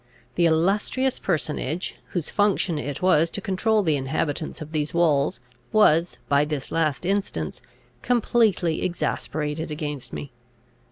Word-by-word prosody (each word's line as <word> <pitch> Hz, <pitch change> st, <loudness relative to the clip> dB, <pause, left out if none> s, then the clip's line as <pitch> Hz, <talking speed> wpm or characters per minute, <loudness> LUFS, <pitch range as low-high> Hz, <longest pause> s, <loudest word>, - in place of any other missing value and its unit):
The 170 Hz, -1 st, +3 dB
illustrious 200 Hz, +10 st, +1 dB
personage, 160 Hz, -1 st, -1 dB
whose 175 Hz, -4 st, -3 dB
functions 195 Hz, -5 st, +1 dB
it 145 Hz, +4 st, -5 dB
was 170 Hz, -3 st, +4 dB
to -, -, -3 dB
control 215 Hz, +1 st, +1 dB
the 155 Hz, -5 st, +2 dB
inhabitants 145 Hz, +3 st, -2 dB
of 155 Hz, 0 st, -8 dB
these 150 Hz, 0 st, -2 dB
walls, 150 Hz, -5 st, +2 dB, 0.3 s
was, 175 Hz, -5 st, +4 dB
by 140 Hz, 0 st, +4 dB
this 150 Hz, -2 st, -4 dB
last 160 Hz, 0 st, 0 dB
instance, 200 Hz, +2 st, -2 dB, 0.4 s
completely 220 Hz, -8 st, +2 dB
exasperated 155 Hz, -3 st, -2 dB
against 150 Hz, -3 st, -5 dB
me. 75 Hz, -1 st, -6 dB
165 Hz, 125 wpm, -24 LUFS, 150-190 Hz, 0.4 s, was